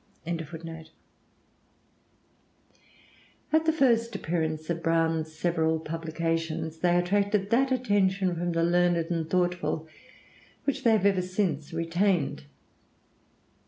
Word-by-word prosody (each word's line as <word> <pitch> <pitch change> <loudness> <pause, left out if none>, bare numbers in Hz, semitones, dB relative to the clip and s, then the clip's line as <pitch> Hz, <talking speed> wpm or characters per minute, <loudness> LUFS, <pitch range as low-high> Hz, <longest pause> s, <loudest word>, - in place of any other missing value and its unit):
"] - - -36
At 165 -1 -6 2.7
the 320 - +4
first 235 -7 +2
appearance 160 -4 -2
of 165 0 -3
Browne's 165 -1 +1
several 160 0 0
publications, 165 0 -3
they 175 -1 +3
attracted 200 +2 +1
that 265 +3 +3
attention 200 -7 +1
from 175 0 -2
the 165 0 +1
learned 175 0 +3
and 165 -2 -2
thoughtful 175 -3 0 0.8
which 280 - -2
they 230 - +5
have 210 -3 +2
ever 195 -2 +3
since 180 -5 -2
retained. 165 - 0
170 Hz, 105 wpm, -27 LUFS, 160-195 Hz, 2.7 s, they